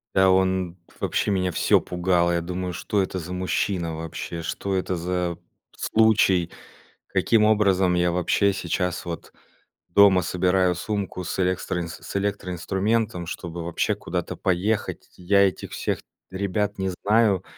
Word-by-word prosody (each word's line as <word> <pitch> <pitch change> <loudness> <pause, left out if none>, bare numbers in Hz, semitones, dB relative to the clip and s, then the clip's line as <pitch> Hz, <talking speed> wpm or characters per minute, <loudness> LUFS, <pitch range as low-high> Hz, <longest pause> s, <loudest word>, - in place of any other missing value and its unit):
Да, 95 0 +5
он 95 -2 +1 0.2
Вообще - - 0
меня 90 -2 +1
всё - - +3
пугало. 90 -1 +1
Я 85 0 +1
думаю: 90 +1 -4
что 100 +4 -1
это 95 0 -4
за 90 +1 -7
мужчина 90 -2 -1
вообще? 80 +1 -5
Что 95 +4 -3
это 95 0 -1
за 90 0 -2 0.4
случай? 100 -6 +3 0.6
Каким 110 -2 +2
образом 95 -4 +3
я 90 0 +2
вообще 90 +3 +2
сейчас 90 -1 -2
вот 85 -1 -7 0.6
дома 95 0 +6
собираю 90 +1 +2
сумку 100 0 -3
с 90 - -4
элекстроинс 90 -2 -1
с - - -9
электроинструментом, 100 0 -1
чтобы 85 -1 -6
вообще 85 0 0
куда-то - - -4
поехать? 95 +4 -1
Я 100 +2 +4
этих 95 - -5
всех - - -2 0.3
ребят 100 +2 -2
не 95 -1 -1
знаю. 100 0 +2
90 Hz, 135 wpm, -24 LUFS, 90-100 Hz, 0.6 s, дома